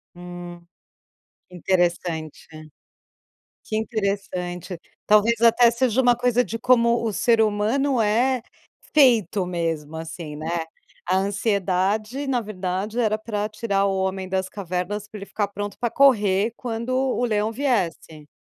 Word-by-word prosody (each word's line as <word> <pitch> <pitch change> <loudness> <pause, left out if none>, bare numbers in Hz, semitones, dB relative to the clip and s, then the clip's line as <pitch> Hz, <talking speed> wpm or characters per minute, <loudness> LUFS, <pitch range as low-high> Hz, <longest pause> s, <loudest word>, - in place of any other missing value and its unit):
Hum, 175 0 -9 0.9
que 180 - -12
interessante, 175 -3 -1 1.2
que 215 - -3
interessante, 195 -5 -3 0.3
talvez 215 +2 +4
até 235 +1 +6
seja 245 +1 +1
uma 245 -1 +4
coisa 245 0 +2
de 230 - -5
como 235 0 +3
o 225 - 0
ser 230 +2 +3
humano 225 +5 +1
é 240 +4 +2 0.5
feito 225 - +4
mesmo, 165 -3 -3
assim, 160 -1 -7
né, 165 +2 -3 0.4
a 185 +1 +2
ansiedade 200 +5 0
na 255 -3 +1
verdade 200 +2 -3
era 215 -2 +2
pra 210 -1 -3
tirar 205 -2 0
o 195 -1 0
homem 190 0 -2
das 190 0 -2
cavernas 195 +2 -4
pra 215 - -10
ele 195 - -7
ficar 205 0 -2
pronto 205 0 -6
pra 240 - 0
correr 220 -5 +3
quando 235 -1 -4
o 260 -1 0
leão 215 -1 0
viesse. 185 - -2
205 Hz, 135 wpm, -23 LUFS, 180-235 Hz, 1.2 s, até